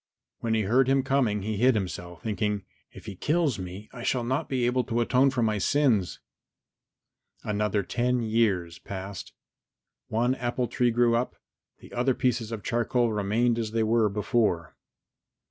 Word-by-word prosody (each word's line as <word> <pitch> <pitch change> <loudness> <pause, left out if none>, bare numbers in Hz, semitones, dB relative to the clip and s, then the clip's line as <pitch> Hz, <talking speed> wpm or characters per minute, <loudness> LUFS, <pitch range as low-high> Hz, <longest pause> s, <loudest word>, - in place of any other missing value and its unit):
When 115 -1 0
he 110 - +1
heard 125 +6 +3
him 135 0 +3
coming 125 -7 +1
he 110 0 -2
hid 125 +3 +4
himself, 90 -3 -4
thinking, 105 -1 -1 0.3
"If - - -13
he 105 -3 -7
kills 150 - 0
me 95 +3 -7
I 125 - -8
shall 125 0 0
not 130 +3 -1
be 130 -3 0
able 125 +1 +2
to 115 +1 -1
atone 125 +3 +3
for 125 -3 0
my 110 -2 +1
sins." 115 -6 +2 1.2
Another 105 -1 0
ten 125 +4 0
years 100 -7 0
passed. 95 0 -7 0.8
One 120 +3 +1
apple 125 -1 -2
tree 120 +1 +1
grew 120 0 +3
up, 120 +2 -1 0.4
the - - -15
other 125 +1 +1
pieces 120 -3 0
of 110 -3 -5
charcoal 120 0 +1
remained 115 +4 +1
as 110 -1 -3
they 115 -1 +2
were 110 -1 +3
before. 105 -5 0
115 Hz, 165 wpm, -27 LUFS, 105-125 Hz, 1.2 s, hid